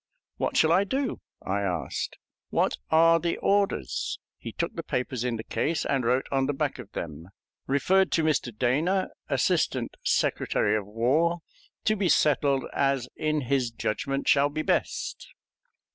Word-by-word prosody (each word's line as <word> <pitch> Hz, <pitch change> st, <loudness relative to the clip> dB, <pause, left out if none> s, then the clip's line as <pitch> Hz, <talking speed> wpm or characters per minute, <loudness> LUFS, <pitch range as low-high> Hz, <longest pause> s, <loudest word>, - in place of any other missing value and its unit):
"What -, -, -1 dB
shall 160 Hz, -, +4 dB
I 185 Hz, +4 st, +5 dB
do?" 260 Hz, +5 st, -2 dB, 0.2 s
I 100 Hz, +2 st, 0 dB
asked; 90 Hz, -8 st, -3 dB, 0.3 s
"what -, -, +1 dB
are 165 Hz, +1 st, +5 dB
the 170 Hz, 0 st, -1 dB
orders?" 200 Hz, -, 0 dB, 0.2 s
He -, -, -6 dB
took -, -, -3 dB
the -, -, -3 dB
papers 125 Hz, -1 st, -2 dB
in 125 Hz, -2 st, -1 dB
the 110 Hz, -, -6 dB
case 160 Hz, +6 st, -1 dB
and 135 Hz, -3 st, 0 dB
wrote 125 Hz, +3 st, +2 dB
on 135 Hz, -1 st, +1 dB
the 145 Hz, -, -1 dB
back -, -, -2 dB
of -, -, -10 dB
them: 80 Hz, 0 st, -6 dB, 0.4 s
Referred 185 Hz, +8 st, +3 dB
to 165 Hz, -, +2 dB
Mr. 150 Hz, -5 st, +1 dB
Dana, 150 Hz, -, +1 dB, 0.2 s
Assistant -, -, +1 dB
Secretary 105 Hz, 0 st, +1 dB
of 105 Hz, -2 st, -2 dB
War, 145 Hz, +11 st, +1 dB, 0.4 s
to 215 Hz, -, +3 dB
be 195 Hz, -4 st, 0 dB
settled 140 Hz, -3 st, +3 dB
as 135 Hz, -3 st, +1 dB
in 155 Hz, -1 st, 0 dB
his 130 Hz, -1 st, 0 dB
judgment 135 Hz, +5 st, -2 dB
shall 140 Hz, 0 st, +4 dB
be 155 Hz, +2 st, -3 dB
best. -, -, -2 dB
140 Hz, 160 wpm, -27 LUFS, 120-165 Hz, 0.4 s, I